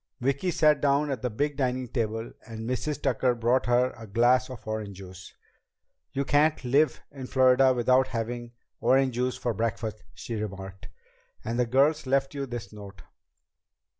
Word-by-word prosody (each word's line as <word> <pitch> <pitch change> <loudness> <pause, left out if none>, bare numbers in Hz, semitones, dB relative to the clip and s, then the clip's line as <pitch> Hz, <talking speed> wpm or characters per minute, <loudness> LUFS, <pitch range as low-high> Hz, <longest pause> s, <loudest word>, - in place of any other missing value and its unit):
Vicki 140 +8 0
sat 150 -4 +3
down 145 +1 +2
at 130 -5 -3
the 125 - -1
big 145 +6 -2
dining 130 -2 -1
table 115 -1 -3 0.2
and 110 -1 -7
Mrs. 130 +4 -2
Tucker 125 -2 +1
brought 120 +2 +1
her 125 +1 +2
a 115 -1 -11
glass 120 +5 +3
of 130 -3 -10
orange 105 -3 -4
juice. 95 -1 -11 0.8
"You 140 +1 -2
can't 145 0 +2
live 145 +5 +2
in 135 -3 -8
Florida 130 0 +5
without 130 +1 +3
having 120 0 -4 0.3
orange 130 +2 +3
juice 125 +1 -1
for 120 - -2
breakfast," 110 0 -3
she 120 - -7
remarked. 95 -2 -7 0.6
"And 115 +2 -2
the 125 - +2
girls 140 +4 +2
left 135 +1 +1
you 140 -1 -4
this 120 -2 -7
note." 100 -5 -11
125 Hz, 165 wpm, -27 LUFS, 115-135 Hz, 0.8 s, Florida